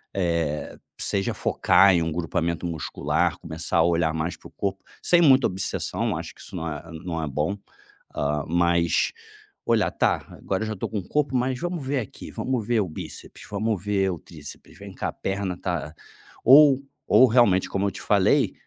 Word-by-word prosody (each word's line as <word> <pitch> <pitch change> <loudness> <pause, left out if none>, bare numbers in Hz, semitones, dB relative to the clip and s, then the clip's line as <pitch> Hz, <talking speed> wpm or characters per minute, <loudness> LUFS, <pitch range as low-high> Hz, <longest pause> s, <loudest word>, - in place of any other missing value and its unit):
Eh, 85 -5 -1 0.2
seja 95 -1 -1
focar 100 -1 +4
em 85 - +2
um 80 0 -1
grupamento 85 +1 -2
muscular, 80 -2 -1
começar 80 +1 -3
a - - +6
olhar 85 -1 +2
mais 80 +1 -3
pro - - -14
corpo, 95 -1 -4 0.2
sem 175 -1 +4
muita 135 -4 +6
obsessão, 95 +1 -2
acho - - -6
que - - -24
isso - - -11
não 85 -2 -3
é 75 - -6 0.2
não 80 -3 -3
é 80 - -3
bom. 75 +8 -2 0.6
Hã, 75 0 -1
mas 85 0 +2 0.5
olhar: - - +2
"Tá, - - 0
agora 95 +2 -3
eu - - -3
já 110 - -2
estou 95 - -4
com 110 -2 -2
o 90 - -10
corpo, 145 -3 0
mas 125 0 0
vamos 175 -5 -4
ver 135 0 0
aqui. 110 - -8
Vamos 125 -5 -2
ver 120 -1 +2
o 95 - -2
bíceps, 80 - -9
vamos 105 -1 -1
ver 100 -2 +1
o 85 - -5
tríceps. 75 -4 -12
Vem - - -10
cá, - - -3
perna 95 -2 -3
tá" 80 -5 -3 0.5
ou 135 +1 +8 0.3
ou 130 - +7
realmente, 110 -6 +4
como 100 +1 0
eu - - -1
te - - -9
falei, - - +3
95 Hz, 185 wpm, -24 LUFS, 85-110 Hz, 0.6 s, ou